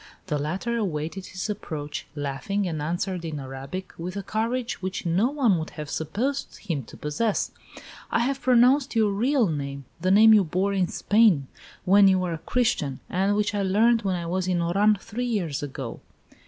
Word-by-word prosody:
The 150 -5 -1
latter 185 +11 -2
awaited 185 -2 -3
his 185 +2 -5
approach, 155 -8 -5
laughing, 145 +8 -2
and 155 -3 -3
answered 175 +3 -2
in 155 -3 -4
Arabic, 135 +7 -7
with 180 +3 -5
a 200 - -3
courage 230 +4 -2
which 185 0 -4
no 185 +8 +2
one 250 - +2
would 160 - -5
have 150 -1 -6
supposed 235 - -2
him 165 -9 -3
to - - -13
possess: 200 +9 -1 0.6
"I 230 - +1
have 270 +3 -1
pronounced 255 +2 +4
your 215 -2 +3
real 245 +5 +2
name; 140 -5 -4 0.2
the 185 - +1
name 220 +3 +7
you 210 -2 +6
bore 185 +4 0
in 190 -2 +1
Spain 205 - +3 0.4
when 200 +2 +6
you 190 -1 +5
were 180 -2 -1
a 160 - -5
Christian, 160 - 0
and 195 +3 +1
which 210 0 0
I 205 - 0
learned 220 +5 +3
when 190 -2 0
I 170 -1 -4
was 185 +2 -1
in 180 -1 +1
Oran 200 +5 +3
three 235 +4 -4
years 180 - -1
ago." 135 -4 -6
190 Hz, 185 wpm, -25 LUFS, 160-220 Hz, 0.6 s, name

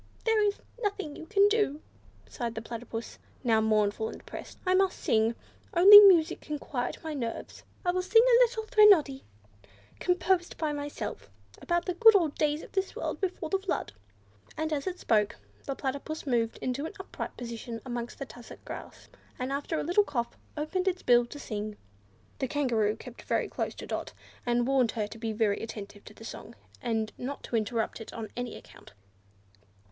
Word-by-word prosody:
"There 445 -1 +3
is 410 -1 +2 0.2
nothing 400 -8 -2
you 320 - -10
can 405 -1 +5
do," 415 -9 +1 0.5
Sighed 235 -3 -4
the 220 - -4
Platypus, 230 0 -7 0.2
now 225 -3 +3
mournful 215 0 +1
and - - -8
depressed. - - -10
"I 365 - +3
must 380 0 +2
sing. 225 +1 +2 0.4
Only 400 +4 +12
music 370 -6 +6
can 300 -1 -4
quiet 255 -3 -3
my 315 -1 -4
nerves. 235 -5 -5 0.2
I 355 - +3
will 365 +1 0
sing 450 +5 +5
a - - +6
little 460 -2 -1
threnody 390 -12 +5 0.7
composed 360 0 +1
by 310 -2 -1
myself, 290 - -5 0.3
about 345 0 0
the 360 - -1
good 445 +4 +7
old 330 -7 +3
days 300 0 0
of - - -12
this 385 0 -2
world - - -4
before 360 -4 -3
the 390 - +2
Flood." 385 - -3 0.6
And 315 0 -1
as 285 +1 -2
it 365 -1 -2
spoke, 210 -2 +2 0.3
the 275 - -3
Platypus 280 +4 -4
moved 235 -4 0
into 265 +4 -2
an - - -10
upright 380 - -6
position 235 -1 -6
amongst 240 -1 -5
the 275 - -5
tussock 245 -2 -13
grass, - - -9 0.3
and 255 +1 -3
after 285 +3 -2
a - - -2
little 355 +6 +3
cough 240 -10 -3 0.2
opened 365 +5 -2
its 370 -1 0
bill 240 -1 +5
to 290 - -9
sing. 215 -5 -5 0.6
The 265 - 0
Kangaroo 235 -7 +1
kept 240 +2 -11
very - - 0
close - - -3
to - - -8
Dot, - - -4 0.3
and 240 0 +2
warned 260 -3 +2
her 215 -3 -1
to 225 +2 -10
be 225 -1 -2
very 215 -2 +1
attentive 205 -2 -8
to 210 - -13
the 225 - -12
song, 235 - -9 0.3
and 225 -3 -1
not 275 +3 -5
to - - -4
interrupt 225 +1 -1
it 225 - -8
on 225 -2 -6
any 245 0 -4
account. - - -14
275 Hz, 185 wpm, -29 LUFS, 230-360 Hz, 0.7 s, Only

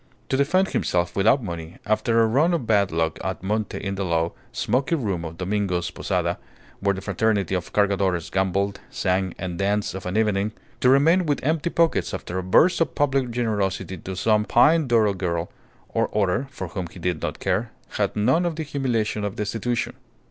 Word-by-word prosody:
To 140 +1 +2
find 185 +6 +2
himself 85 - 0
without 115 +7 +3
money 85 -4 -6
after 115 +2 +2
a - - +4
run 150 +10 +3
of 135 - -3
bad 100 -4 +2
luck 80 -1 -1
at - - -4
monte 105 +1 -1
in 100 -1 -3
the 100 0 -2
low, 85 -2 0 0.2
smoky 135 +6 0
room 100 - -2
of 80 0 -7
Domingo's 90 -2 -1
posada, - - -1 0.4
where 100 0 +1
the 95 - -6
fraternity 100 -1 0
of 90 -2 -2
Cargadores 95 -4 +1
gambled, 100 +1 0
sang, 95 -1 -1
and 90 -1 -5
danced 100 +1 0
of 95 -1 -6
an 90 +3 -1
evening; 105 -1 +1 0.3
to 125 - +4
remain 160 +7 +4
with 145 -2 0
empty 155 +3 +1
pockets 170 -1 +1
after 90 +2 -4
a - - -4
burst 160 - +4
of 165 - 0
public 135 -3 +1
generosity 105 -6 -1
to 95 +2 -7
some 105 +3 +2
peyne 150 +8 +4
d'oro 110 -4 +3
girl 85 -2 -2 0.4
or - - 0
other 105 +7 +1
(for 95 -9 -6
whom 90 0 -4
he 85 - -14
did 90 -2 -2
not - - -3
care), 100 +5 -1 0.2
had - - -1
none 130 +11 +3
of 170 -2 -1
the 160 - -3
humiliation 120 -8 -1
of 100 0 -3
destitution. 115 +3 -2
105 Hz, 190 wpm, -24 LUFS, 95-125 Hz, 0.4 s, a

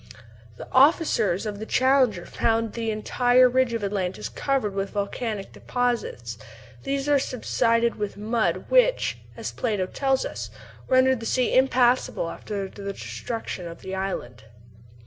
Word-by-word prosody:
The - - -9
officers 260 - +3
of 205 -1 -4
the 220 - -5
Challenger 255 -9 +3
found 225 -1 0
the 230 -1 -2
entire 245 +4 +3
ridge 255 -1 +2
of 230 -2 -2
Atlantis 195 -2 -2
covered 265 -8 -1
with 195 0 -2
volcanic 205 0 -3
deposits; 245 - -2 0.4
these 275 0 -2
are 290 -1 +5
the - - +2
subsided 230 -4 0
mud 220 +2 0
which, - - +3 0.2
as - - -4
Plato 210 -6 -1
tells 270 +7 0
us, - - -5 0.4
rendered 260 -1 +4
the 225 - -5
sea 255 -1 +1
impassable 250 -8 +2
after 200 -2 -5
the 200 +1 -6
destruction 225 -5 -5
of 170 0 -10
the 190 - -6
island. 130 - -4
230 Hz, 140 wpm, -25 LUFS, 200-255 Hz, 0.4 s, are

